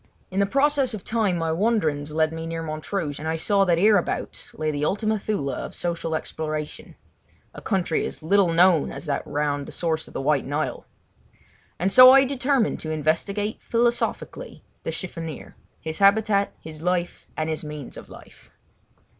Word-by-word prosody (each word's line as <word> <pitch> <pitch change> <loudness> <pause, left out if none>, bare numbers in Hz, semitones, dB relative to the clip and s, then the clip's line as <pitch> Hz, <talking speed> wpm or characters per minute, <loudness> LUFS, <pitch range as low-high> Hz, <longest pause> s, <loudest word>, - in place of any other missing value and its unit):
In 190 - -1
the 200 - +3
process 275 -1 +2
of 200 - -9
time 215 -6 0
my 165 -1 -1
wanderings 160 -7 0
led 155 +1 +1
me 165 0 -5
near 165 0 -4
Montrouge, 155 0 -3
and 155 - -5
I 160 - 0
saw 195 +4 +2
that 175 -2 +3
hereabouts 205 0 +1
lay 155 0 -1
the 145 0 -3
Ultima 215 +6 0
Thule 195 -10 -2
of - - -6
social 170 -2 -2
exploration—a 155 -1 -7
country 185 -5 0
as - - -8
little 190 +1 +3
known 170 -2 +4
as - - -6
that 140 -2 -1
round 145 -1 -1
the - - -8
source 160 -2 -2
of - - -15
the - - -2
White 140 -1 +1
Nile. 145 +3 -3 0.9
And 185 +3 0
so 255 +3 +10
I 270 0 +7
determined 265 -2 0
to 155 - -5
investigate 165 +8 -1
philosophically 240 - -1 0.2
the - - -3
chiffonier—his 165 -2 -8
habitat, 200 0 +3
his 155 -1 -10
life, 180 0 -2
and 155 - -1
his 160 0 -3
means 150 -3 -7
of - - -11
life. - - -15
170 Hz, 165 wpm, -24 LUFS, 155-205 Hz, 0.9 s, so